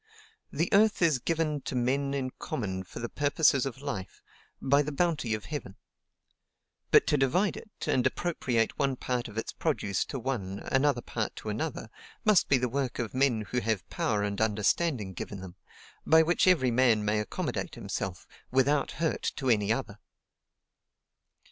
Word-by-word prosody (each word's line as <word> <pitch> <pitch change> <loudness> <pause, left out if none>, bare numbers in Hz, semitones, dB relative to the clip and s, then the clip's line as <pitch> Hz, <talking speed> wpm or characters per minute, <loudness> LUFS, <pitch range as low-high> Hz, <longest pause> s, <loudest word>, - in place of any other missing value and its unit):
"The 165 +4 0
earth 210 -2 +4
is 155 -6 +3
given 155 0 -1
to 135 - -5
men 135 +3 0
in 130 -2 -2
common 95 -5 -3
for 90 - -12
the 120 0 -3
purposes 145 -1 +2
of 135 +1 -8
life, 110 -10 -5 0.4
by 140 +2 +3
the 150 +1 -3
bounty 150 -7 0
of 105 - -8
Heaven. 140 -11 -6 1.1
But - - +6
to 150 - +2
divide 175 +10 +2
it, - - -10 0.2
and 125 - +2
appropriate 125 -10 -1
one 135 -2 +1
part 125 -1 -2
of 105 - -11
its 115 - -3
produce 100 -3 -1
to 140 - -5
one, 115 -7 -3
another 140 +2 +2
part - - -3
to - - -6
another, - - -4 0.3
must 215 -6 +4
be 140 - +5
the 125 0 0
work 130 0 -2
of 120 -3 -3
men 130 -4 +2
who 125 - +1
have 110 -5 -1
power 105 -1 0
and 100 0 -2
understanding 110 - +1
given 100 +3 -6
them, 95 -2 -9 0.5
by 160 0 +6
which 175 +3 +2
every 150 -9 +4
man 115 -3 +3
may 105 +1 +1
accommodate 105 - -3
himself, 90 -3 -4 0.2
WITHOUT 135 +2 +2
HURT 165 0 -1
TO 130 -3 +1
ANY 105 -2 +2
OTHER. 115 -4 -2
130 Hz, 165 wpm, -29 LUFS, 110-145 Hz, 1.1 s, But